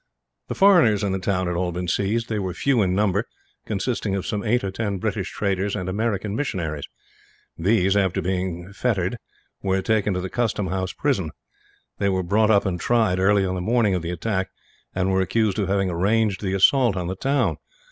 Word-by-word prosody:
The - - -4
foreigners 170 - +5
in 100 - 0
the 95 - -1
town 95 -1 0
had 90 0 -2
all 90 0 -1
been 90 +1 -4
seized. 105 +6 0
They 110 -2 -2
were 95 -3 -3
few 135 0 +2
in 90 -2 +1
number, 100 +1 +1 0.4
consisting 105 -1 -1
of 95 - -3
some 105 -1 -2
eight 120 +1 +1
or 95 - -2
ten 100 0 -2
British 90 - -2
traders 100 0 -1
and 90 - -4
American 105 0 -1
missionaries. 85 - -3 0.7
These, 95 +2 +2
after 95 -2 +1
being 90 0 -3
fettered, 105 -1 -1 0.4
were 95 -1 0
taken 105 -3 +1
to - - -1
the 95 - -3
Custom 105 -3 -1
House 95 0 -2
prison. 125 - 0 0.7
They 100 - +2
were 95 -1 0
brought 105 +5 +2
up 100 -2 +4
and 90 -3 -1
tried, 110 -6 +2
early 100 +1 +3
on 95 - -1
the 90 - -3
morning 110 0 +2
of 90 - 0
the 85 - -4
attack, 95 +2 -2 0.5
and 95 +1 +1
were 95 0 +2
accused 105 +2 0
of 100 - 0
having 95 -1 +1
arranged 100 +4 +1
the 95 -2 -1
assault 120 +2 +4
on 90 - -2
the 90 +2 -3
town. 140 +7 0
95 Hz, 200 wpm, -23 LUFS, 95-110 Hz, 0.7 s, foreigners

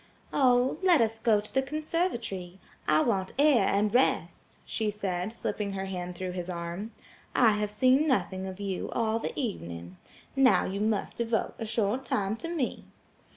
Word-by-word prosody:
"Oh, 255 +1 +3
let 360 -5 +5
us 225 -1 +1
go 225 -2 +3
to 210 - -9
the 265 - +3
conservatory. 265 - -2 0.3
I 155 0 +4
want 190 +2 0
air 275 -8 +5
and 205 +1 +1
rest," 255 +2 0
she 220 -2 -1
said, 195 -2 -2
slipping 205 -3 -3
her 195 0 -3
hand 180 -2 -5
through 185 +1 -4
his 180 0 -5
arm. 170 +4 -4 0.5
"I 235 -3 +6
have 210 0 -1
seen 255 +7 +4
nothing 190 -8 0
of 190 0 -7
you 195 -2 -3
all 225 -1 +1
the - - -4
evening. 85 - -5 0.4
Now 270 -2 +5
you 195 +2 -3
must 215 -1 -1
devote 230 -1 0
a 225 - -4
short 220 +4 0
time 200 +1 0
to 330 - -6
me." 325 -7 -2
210 Hz, 170 wpm, -29 LUFS, 190-250 Hz, 0.5 s, I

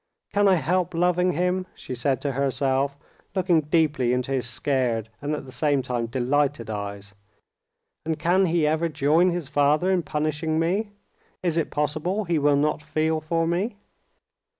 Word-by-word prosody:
"Can 205 0 +4
I 190 - +5
help 175 +3 0
loving 180 +1 +2
him?" 180 +2 0
she - - -7
said 130 +2 -1
to 145 - -1
herself, 135 +1 0 0.4
looking 180 -3 +3
deeply 150 -5 +1
into 125 +1 -1
his 125 -2 -1
scared 125 -5 -1
and 145 +1 -1
at 150 - -7
the 130 - -11
same 145 -1 +1
time 120 -2 -2
delighted 130 0 0
eyes. 100 -1 -6 0.9
"And 160 0 -2
can 180 +4 +2
he 165 -2 +2
ever 160 +2 +1
join 155 +5 +3
his 175 -4 -3
father 150 +5 +2
in 185 -2 +2
punishing 155 +1 -1
me? 190 +7 0 0.5
Is 170 -3 +1
it 165 -2 0
possible 155 +8 -1
he 170 -4 0
will 145 0 +3
not 150 +2 +1
feel 155 +1 0
for 165 +1 0
me?" 185 +7 -1
150 Hz, 165 wpm, -25 LUFS, 135-170 Hz, 0.9 s, I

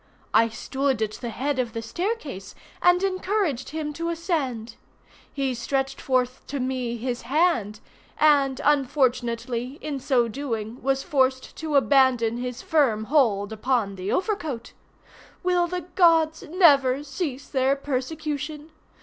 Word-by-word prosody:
I 230 +1 +5
stood 265 +2 -1
at 215 - -2
the 235 +2 -6
head 260 +4 -2
of 240 -3 -1
the 230 - -3
staircase, 300 - -4 0.3
and 355 +1 +4
encouraged 370 - -1
him 300 -1 -4
to 335 +3 -3
ascend. 290 - -2 0.6
He 270 -2 -1
stretched 270 +3 -2
forth 255 -1 0
to 280 - -4
me 255 -2 -2
his 240 +1 -3
hand, 245 - +1 0.4
and 280 -3 +4
unfortunately 250 -3 0
in 290 -3 -4
so 250 -3 +2
doing 230 -2 -4
was 270 0 0
forced 260 -5 0
to 315 -2 -3
abandon 260 -4 +4
his 250 0 -5
firm 260 -9 +2
hold 220 -8 +3
upon 220 -2 0
the 190 +1 -4
overcoat. 325 - -2 0.7
Will 355 -1 +2
the 360 +1 -3
gods 325 -3 +4
never 285 -6 +4
cease 280 -2 -4
their 265 0 +2
persecution? 295 +2 -4
270 Hz, 130 wpm, -25 LUFS, 240-310 Hz, 0.7 s, I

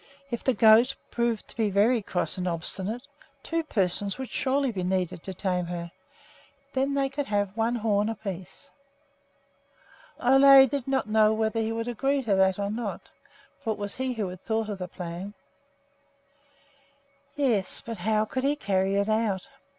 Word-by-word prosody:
If 235 - -3
the 260 - +2
goat 225 +5 +6 0.2
proved 235 -2 -1
to - - -12
be 220 -2 +1
very 215 +5 +3
cross 185 -3 -2
and 180 - -2
obstinate, 190 +8 -2 0.4
two 330 0 -1
persons 200 - -1
would 265 -1 -6
surely 270 0 +1
be 195 -4 -4
needed 180 -2 -1
to 190 - -6
tame 180 -2 -1
her. 170 -1 -5 0.8
Then 275 +1 0
they 275 -1 +2
could 280 +1 -4
have 205 -1 -1
one 230 +1 +1
horn 210 -2 +1
apiece. 200 +4 -7 1.5
Ole 270 +1 +8
did 270 0 -3
not 265 -4 0
know 215 0 +4
whether 220 +1 0
he 225 0 -1
would 230 +1 -3
agree 270 +4 0
to 215 -4 +1
that 190 -1 +3
or 200 0 -2
not, 220 -2 -5 0.5
for 225 - -1
it - - -11
was 205 -1 -4
he 260 0 -1
who 215 -5 -2
had 180 0 -10
thought 220 -1 -1
of 200 -2 -5
the 180 - -4
plan. 180 +3 -7 2.0
Yes, 245 -10 0
but 230 -1 -7
how 215 0 +1
could 260 +4 -3
he 285 +2 +2
carry 195 -5 0
it 200 +1 +1
out? 215 0 0
220 Hz, 170 wpm, -27 LUFS, 195-250 Hz, 2.0 s, Ole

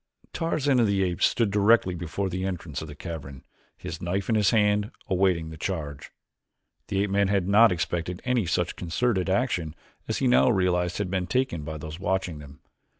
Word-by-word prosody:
Tarzan 145 -5 +1
of 115 - +4
the 100 -1 +1
Apes 90 0 +2
stood 115 -4 0
directly 105 -1 +4
before 85 +3 -3
the 95 0 -3
entrance 85 -7 -4
to 80 - -7
the 75 - -9
cavern, 70 -5 -8 0.3
his 80 +2 -7
knife 95 +4 -2
in - - +3
his 105 -2 +3
hand, 105 -1 +2 0.2
awaiting 90 -4 +1
the 80 - -9
charge. 75 -7 -4 0.8
The 100 0 0
ape 100 - -2
man 100 0 +3
had 95 -2 +1
not 110 +3 +6
expected 90 +1 -2
any 125 -7 +1
such 90 0 0
concerted 95 +3 -1
action 95 - 0 0.3
as - - -1
he - - 0
now 65 +2 +5
realized 90 -2 +1
had 100 -3 -2
been 95 -2 -1
taken 125 -5 0
by 80 +1 -5
those 80 +2 -8
watching 95 -4 -1
them. 70 -2 -13
90 Hz, 190 wpm, -26 LUFS, 80-100 Hz, 0.8 s, not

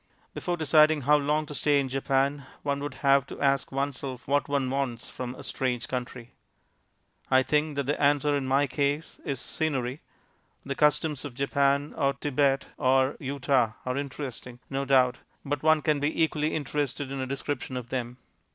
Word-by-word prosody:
Before 175 -1 -2
deciding 155 0 +4
how 145 +3 +4
long 150 +1 +1
to 150 - -8
stay 145 0 +2
in 135 - 0
Japan, 135 +1 0 0.2
one 140 -1 -1
would 145 -2 -5
have 140 0 +5
to - - -9
ask 140 -1 +1
oneself 135 -2 -3
what 145 +1 +2
one 140 -2 +1
wants 130 -3 -3
from 125 0 -5
a - - -10
strange 125 -2 -2
country. 125 -1 -5 1.0
I 130 0 +5
think 150 +2 +1
that 140 - 0
the 145 +2 -1
answer 145 0 +3
in 135 -2 -1
my 135 +2 +3
case 145 +3 -2
is 140 -3 -3
"Scenery." 135 -3 -2 0.6
The 140 - -2
customs 150 0 +2
of 140 -4 -7
Japan, 140 +1 +1
or 140 0 +1
Thibet, 140 -1 +1
or 130 0 +3
Utah 130 -4 +1
are 125 0 -1
interesting, 135 -3 -6
no 135 +1 -1
doubt, 130 -2 +3 0.3
but 145 -1 -2
one 155 -1 +4
can 150 -2 +2
be 145 +3 +1
equally 155 -1 0
interested 145 -1 -2
in 135 - -4
a 130 - -3
description 135 -1 -3
of 120 -1 -6
them. 125 -1 -3
140 Hz, 175 wpm, -27 LUFS, 130-145 Hz, 1.0 s, have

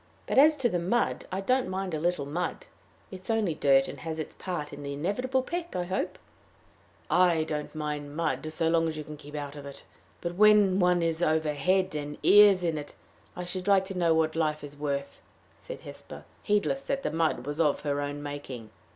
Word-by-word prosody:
But - - +3
as 305 +2 +7
to 270 -4 +1
the 180 -6 -1
mud, 195 +8 0
I 190 +1 -2
don't 255 +4 +1
mind 190 -1 -3
a 155 - -1
little 175 -3 0
mud. 175 - -3 0.5
It 185 -1 -8
is - - -13
only 220 -6 +1
dirt, 135 -2 +4
and - - -8
has 160 -1 -5
its 155 - -5
part 170 -6 -5
in 145 - -8
the 140 0 -5
inevitable 250 - -1
peck, 345 +3 -5
I 180 - 0
hope." 185 +2 -3 0.9
"I 175 -3 +4
don't 150 0 -4
mind 150 -1 -4
mud 155 -1 -2
so 160 +1 0
long 165 0 +3
as 155 -1 -4
you 155 - -4
can 150 +1 -9
keep 145 0 -11
out 145 -1 -5
of 145 -1 -8
it. 140 - -10 0.4
But 170 0 -4
when 205 -1 +5
one 180 -1 +3
is 165 0 -1
over 155 -2 +2
head 185 +5 +1
and 150 -1 -4
ears 200 -2 +7
in 165 -3 0
it, 145 - -9 0.4
I 180 - -5
should 180 +2 -5
like 195 -1 +4
to 190 0 -6
know 170 -2 +3
what 160 0 +1
life 155 -2 0
is 145 0 -8
worth," 140 -1 -4 0.3
said - - -9
Hesper, - - -10 0.2
heedless 210 +6 +1
that 275 0 -2
the - - -1
mud 160 -6 0
was 145 +2 -4
of 150 -3 +2
her 145 -1 -1
own 145 0 -4
making. 135 -6 -7
165 Hz, 215 wpm, -28 LUFS, 150-190 Hz, 0.9 s, as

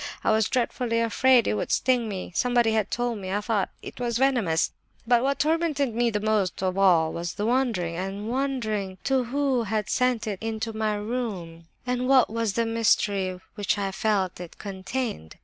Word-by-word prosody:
I - - +3
was 220 -1 +2
dreadfully 240 -2 0
afraid 240 +2 +4
it - - +1
would 105 - -2
sting 245 -3 +2
me; 190 -3 -5
somebody 240 +1 +2
had 215 -2 +1
told 240 -2 -1
me, 190 -1 -5
I 205 - +1
thought, 210 -3 0
that - - -8
it - - -9
was 240 -2 -1
venomous; 240 -11 +2 0.3
but 240 0 +4
what 275 +2 +1
tormented 305 -5 +1
me 235 +1 +1
most 210 -3 0
of 185 -1 0
all 175 -5 +4
was 170 0 -4
the 210 - -2
wondering 230 -9 0
and 195 +3 -4
wondering 230 -7 -1
as - - -18
to 265 -2 +1
who 270 0 +1
had 215 0 -2
sent 250 -3 +1
it 205 -3 -4
into 225 0 -3
my 215 -1 0
room, 205 -7 -4 0.2
and 250 0 -1
what 260 -4 +5
was 230 -2 -1
the 230 +2 +1
mystery 205 -4 +1
which 205 -1 -1
I 195 -1 -1
felt 195 -3 0
it 175 -2 -9
contained. 200 - -5
220 Hz, 190 wpm, -26 LUFS, 195-245 Hz, 0.3 s, what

